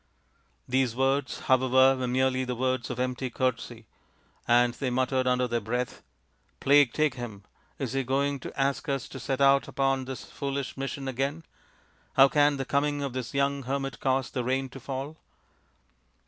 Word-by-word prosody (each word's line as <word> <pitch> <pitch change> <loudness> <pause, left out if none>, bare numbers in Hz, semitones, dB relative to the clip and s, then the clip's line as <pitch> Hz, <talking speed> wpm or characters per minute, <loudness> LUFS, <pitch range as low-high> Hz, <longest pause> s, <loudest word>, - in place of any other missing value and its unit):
These 130 -2 +1
words, 135 +1 0
however, 130 +1 +4
were 130 -1 -2
merely 130 +1 +1
the 125 -1 -3
words 130 -1 -1
of 125 - -4
empty 125 0 -2
courtesy, 120 -2 -2 0.6
and 120 0 +4
they 130 +1 -3
muttered 130 +1 0
under 125 0 +2
their 120 -1 -1
breath, 125 +3 -3 0.3
" - - -41
Plague 145 -2 +5
take 150 -1 +1
him; 115 -6 -7 0.3
is 135 -4 -3
he 135 - +1
going 140 +2 0
to 130 - -8
ask 140 +2 0
us 135 -3 -1
to - - -8
set 135 -1 -2
out 140 0 +5
upon 135 -1 0
this 130 -1 -6
foolish 140 -1 -4
mission 135 0 -4
again? 135 +5 -2 0.7
How 135 0 +7
can 145 0 +3
the 135 - -3
coming 145 +1 0
of 135 -3 -3
this 130 0 -5
young 140 0 +1
hermit 135 0 -3
cause 130 -1 0
the 125 - -2
rain 130 +2 -1
to 135 - -10
fall 135 +4 -5
130 Hz, 175 wpm, -28 LUFS, 125-140 Hz, 0.7 s, How